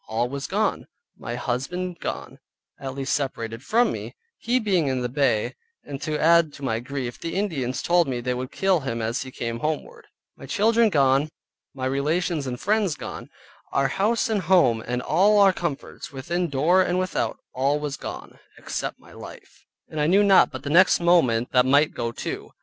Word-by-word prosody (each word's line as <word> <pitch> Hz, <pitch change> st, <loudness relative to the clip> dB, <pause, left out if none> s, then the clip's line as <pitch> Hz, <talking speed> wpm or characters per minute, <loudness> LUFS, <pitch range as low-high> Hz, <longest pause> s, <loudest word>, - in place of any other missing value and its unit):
All 115 Hz, +2 st, 0 dB
was 140 Hz, +1 st, -5 dB
gone, -, -, -1 dB, 0.3 s
my 120 Hz, -, -6 dB
husband 170 Hz, +10 st, -3 dB
gone -, -, -6 dB, 0.4 s
(at 135 Hz, -1 st, -6 dB
least 135 Hz, -1 st, -2 dB
separated 115 Hz, -5 st, -3 dB
from 230 Hz, -, +2 dB
me, -, -, -6 dB, 0.2 s
he 245 Hz, +2 st, +1 dB
being 190 Hz, -, +1 dB
in 130 Hz, -2 st, -1 dB
the 125 Hz, -, -2 dB
Bay; 125 Hz, -3 st, +1 dB, 0.3 s
and 140 Hz, -1 st, -7 dB
to 155 Hz, -1 st, -2 dB
add 165 Hz, 0 st, +4 dB
to 140 Hz, -, -12 dB
my 115 Hz, -4 st, 0 dB
grief, 125 Hz, -1 st, -5 dB
the 165 Hz, -, -5 dB
Indians 145 Hz, -11 st, -2 dB
told 175 Hz, -1 st, +3 dB
me 125 Hz, -2 st, -2 dB
they 125 Hz, +1 st, -2 dB
would 125 Hz, +1 st, -5 dB
kill 190 Hz, -2 st, +2 dB
him 135 Hz, -5 st, -4 dB
as 115 Hz, +3 st, -2 dB
he 130 Hz, -, -6 dB
came 115 Hz, -2 st, -4 dB
homeward), 420 Hz, -, -4 dB, 0.3 s
my -, -, -11 dB
children 225 Hz, +2 st, +3 dB
gone, 140 Hz, -2 st, +3 dB, 0.5 s
my 130 Hz, -1 st, -4 dB
relations 150 Hz, +3 st, 0 dB
and 125 Hz, -1 st, -4 dB
friends 205 Hz, -5 st, +1 dB
gone, -, -, -8 dB, 0.4 s
our 135 Hz, 0 st, +1 dB
house 210 Hz, -, +1 dB
and 215 Hz, -3 st, 0 dB
home 155 Hz, -11 st, +3 dB
and 125 Hz, +1 st, -2 dB
all 205 Hz, +3 st, +3 dB
our 200 Hz, -2 st, +6 dB
comforts 170 Hz, -6 st, -5 dB
within 170 Hz, +6 st, -2 dB
door 155 Hz, +7 st, +3 dB
and 180 Hz, -1 st, 0 dB
without 185 Hz, 0 st, -1 dB, 0.2 s
all 140 Hz, +3 st, +1 dB
was 145 Hz, -2 st, -3 dB
gone -, -, -8 dB, 0.2 s
(except -, -, -4 dB
my -, -, -18 dB
life), -, -, -13 dB, 0.2 s
and 155 Hz, -, -4 dB
I 150 Hz, -, +2 dB
knew 195 Hz, +5 st, +5 dB
not 195 Hz, -2 st, +6 dB
but -, -, -8 dB
the 140 Hz, -, -3 dB
next 185 Hz, +4 st, +5 dB
moment 130 Hz, -10 st, +3 dB
that 125 Hz, -1 st, +5 dB
might 145 Hz, +4 st, +3 dB
go 115 Hz, -1 st, -3 dB
too. -, -, -6 dB
145 Hz, 190 wpm, -24 LUFS, 130-180 Hz, 0.5 s, our